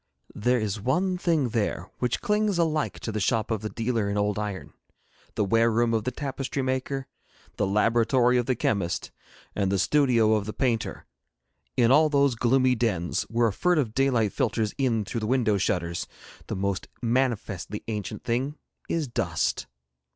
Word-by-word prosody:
There 125 +4 +1
is 105 -1 -2
one 180 - +1
thing 160 -8 +1
there 105 -5 -2
which 125 -1 -1
clings 210 -2 +1
alike 155 -3 0
to 110 - -3
the 110 - -2
shop 110 +3 0
of 110 -2 -1
the 110 - -3
dealer 115 -3 -1
in 100 - -1
old 105 0 0
iron, 105 -3 -5 0.6
the - - +1
ware 115 +3 +3
room 115 +1 +2
of 110 -1 0
the 125 - 0
tapestry 135 -1 -3
maker, 130 +1 -2 0.5
the 105 - +1
laboratory 120 +4 +3
of 120 - -2
the 130 - +2
chemist, 100 -6 -1 0.4
and 100 -2 0
the 100 - +2
studio 115 0 +3
of 105 -1 0
the 105 - -4
painter: 120 -4 -1 0.7
in 120 -1 +4
all 155 +3 +6
those 140 -2 +3
gloomy 130 +2 +3
dens 105 -8 -1
where 115 0 +2
a - - -5
furtive 150 - +1
daylight 120 -5 +2
filters 110 -2 0
in 115 -6 +1
through 115 - -3
the 110 - -3
window 115 -5 +2
shutters 85 -2 -1 0.4
the - - -3
most 100 0 -2 0.2
manifestly 115 -5 -1
ancient 105 -3 -4
thing 130 +5 -1 0.3
is 160 -3 0
dust. 120 - -1
115 Hz, 170 wpm, -26 LUFS, 105-130 Hz, 0.7 s, all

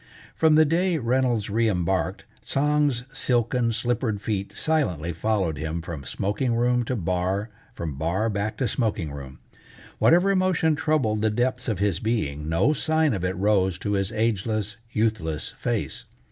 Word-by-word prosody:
From 160 -1 +4
the 155 0 +6
day 170 +3 +1
Reynolds 125 -4 +1
reëmbarked, 95 -4 0 0.2
Tsang's 145 -3 +1
silken, 120 -2 +1
slippered 115 -1 -1
feet 100 -2 -3
silently 90 - 0
followed 90 -4 0
him 80 +2 -3
from 80 -5 -6
smoking 105 - -1
room 125 +1 +2
to 130 - -1
bar, 95 +2 -1 0.2
from 75 -5 -5
bar 90 +8 0
back 105 0 -2
to 130 - 0
smoking 105 - -1
room. 70 -2 -8 0.6
Whatever 180 +4 +5
emotion 185 -5 +2
troubled 145 -9 +1
the 110 - +3
depths 125 +3 -1
of 110 -5 0
his 100 -3 0
being, 75 -11 -2
no 95 - +3
sign 155 -1 +1
of 95 -4 -3
it 90 +1 -1
rose 95 -2 +2
to 105 - -3
his 95 0 0
ageless, 110 -2 -1 0.2
youthless 105 -10 -1
face. - - -3
110 Hz, 150 wpm, -25 LUFS, 95-130 Hz, 0.6 s, the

